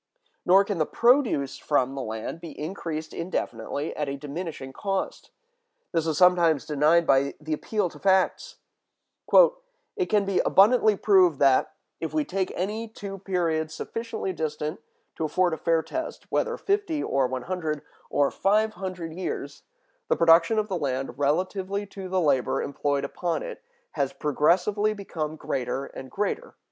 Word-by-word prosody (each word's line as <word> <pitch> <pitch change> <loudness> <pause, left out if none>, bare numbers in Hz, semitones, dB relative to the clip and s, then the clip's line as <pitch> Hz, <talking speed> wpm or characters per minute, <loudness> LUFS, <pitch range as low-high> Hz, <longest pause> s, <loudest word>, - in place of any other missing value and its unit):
Nor 195 +2 +6
can 200 -4 -3
the 155 - +1
produce 235 - +2
from 135 -3 +1
the 135 - -4
land 110 +7 -5
be 165 -4 -9
increased 155 -1 -5
indefinitely 145 -4 -3
at 150 -2 -2
a 140 - -4
diminishing 145 -2 -6
cost. 195 +3 -3 0.6
This 165 -1 0
is 155 -2 0
sometimes 170 -5 +4
denied 155 +3 +3
by 135 -1 +3
the 155 +1 -4
appeal 210 +6 -1
to - - -14
facts: 195 - +1 1.4
"It 375 -4 0
can 210 -2 +2
be 195 -1 +1
abundantly 215 +1 +5
proved 185 -6 +4
that, 135 -1 +3 0.2
if - - -4
we 305 -1 +1
take 190 -3 -2
any 210 +5 -2
two 200 -3 -8
periods 165 -4 -1
sufficiently 230 -3 -4
distant 150 -1 -3 0.4
to 160 - -1
afford 175 +2 +1
a - - -2
fair 165 -1 +1
test, 325 0 -5
whether - - 0
fifty 395 -7 0
or 135 -2 +1
one 130 0 -4
hundred 160 -4 -3 0.3
or 140 -1 +2
five 215 +3 +2
hundred 185 -4 -5
years, 185 +2 -5 0.5
the - - +2
production 165 +6 +5
of 215 -1 +1
the 185 -4 -2
land 135 -2 -3
relatively 185 +7 0
to 195 -1 -8
the 190 0 +1
labor 140 -6 +2
employed 140 0 -1
upon 170 +4 -2
it - - -7 0.3
has - - -1
progressively 185 +8 +1
become 160 -6 -4
greater 135 -2 -3
and 130 -1 -9
greater." 455 - -3
170 Hz, 155 wpm, -26 LUFS, 150-200 Hz, 1.4 s, Nor